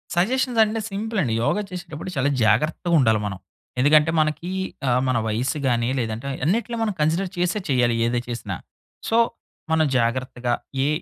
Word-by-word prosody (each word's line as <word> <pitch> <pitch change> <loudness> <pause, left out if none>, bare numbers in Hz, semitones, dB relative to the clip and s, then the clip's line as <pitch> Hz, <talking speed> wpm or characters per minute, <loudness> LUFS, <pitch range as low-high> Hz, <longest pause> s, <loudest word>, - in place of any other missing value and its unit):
Suggestions 240 +6 +1
అంటే, 220 +1 -1
simple 215 +2 -2
అండి. 115 - -1
యోగ 120 - +2
చేసేటప్పుడు 180 -2 -6
చాలా 135 +1 +2 0.2
జాగ్రత్తగుండాలి 130 - +3
మనం. 100 -2 -3 0.4
ఎందుకంటే, 150 +4 +5
మనకి 155 +3 0 0.4
ఆహ్, 125 +1 +3
మన 125 - +2
వయస్సు 120 +7 -1
గాని, 120 -1 +1
లేదంటే 115 +3 -3 0.2
అన్నిట్లో 230 +7 0
మనం 215 -2 0
కన్సిడర్ 170 +5 +1
చేసే 180 +4 +1
చేయాలి. 125 -3 +3
ఏది 120 0 0
చేసినా. 115 -5 -4 0.5
సో, 225 - +3 0.5
మనం 160 -1 +4
జాగ్రత్తగా 120 +1 -1 0.3
ఏ - - +2
150 Hz, 145 wpm, -23 LUFS, 120-180 Hz, 0.5 s, ఎందుకంటే